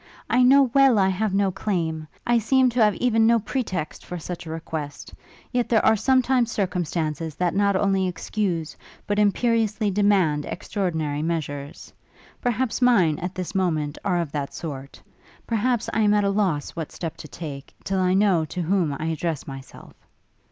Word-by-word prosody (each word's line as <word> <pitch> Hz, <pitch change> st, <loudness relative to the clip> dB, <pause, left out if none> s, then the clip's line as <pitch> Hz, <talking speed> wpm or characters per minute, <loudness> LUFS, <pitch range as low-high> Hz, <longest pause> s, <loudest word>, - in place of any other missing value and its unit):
I 250 Hz, -, +4 dB
know 270 Hz, +3 st, +7 dB
well 270 Hz, -4 st, +5 dB
I 190 Hz, -1 st, +4 dB
have 200 Hz, +2 st, -1 dB
no 195 Hz, 0 st, +2 dB
claim; 165 Hz, -5 st, -2 dB, 0.2 s
I 240 Hz, 0 st, +3 dB
seem 255 Hz, +3 st, +3 dB
to 235 Hz, -1 st, +3 dB
have 210 Hz, -2 st, +3 dB
even 225 Hz, -3 st, +2 dB
no 235 Hz, 0 st, +5 dB
pretext 215 Hz, -, -3 dB
for 180 Hz, -, -6 dB
such 170 Hz, 0 st, -7 dB
a -, -, -6 dB
request; 160 Hz, -2 st, -6 dB, 0.4 s
yet 245 Hz, -1 st, 0 dB
there 225 Hz, -2 st, +3 dB
are 220 Hz, -, +5 dB
sometimes 255 Hz, 0 st, +2 dB
circumstances 165 Hz, -5 st, -2 dB
that 180 Hz, -2 st, 0 dB
not 200 Hz, 0 st, +2 dB
only 195 Hz, -1 st, +2 dB
excuse, 180 Hz, -3 st, -3 dB, 0.3 s
but 205 Hz, 0 st, 0 dB
imperiously 215 Hz, 0 st, +1 dB
demand 185 Hz, -7 st, +2 dB
extraordinary 160 Hz, -7 st, -2 dB
measures: 145 Hz, -3 st, -4 dB, 0.5 s
perhaps 245 Hz, 0 st, -1 dB
mine, 190 Hz, -12 st, +4 dB
at 180 Hz, +2 st, -5 dB
this 185 Hz, -2 st, -5 dB
moment, 155 Hz, -6 st, -1 dB
are 185 Hz, -3 st, +1 dB
of 165 Hz, -4 st, -3 dB
that 145 Hz, -2 st, -4 dB
sort! 140 Hz, -4 st, -7 dB, 0.5 s
perhaps 235 Hz, +1 st, 0 dB
I -, -, +1 dB
am 210 Hz, -1 st, +4 dB
at 205 Hz, -, +2 dB
a 200 Hz, -, +2 dB
loss 185 Hz, -8 st, 0 dB
what 165 Hz, -3 st, -6 dB
step 165 Hz, -3 st, -5 dB
to -, -, -9 dB
take, 145 Hz, -4 st, -8 dB
till 195 Hz, -1 st, -1 dB
I 185 Hz, 0 st, +2 dB
know 195 Hz, -5 st, +3 dB
to 180 Hz, +4 st, -5 dB
whom 165 Hz, -5 st, 0 dB
I 155 Hz, -, -3 dB
address 160 Hz, -2 st, -2 dB
myself!' 135 Hz, -1 st, -11 dB
190 Hz, 175 wpm, -24 LUFS, 160-220 Hz, 0.5 s, know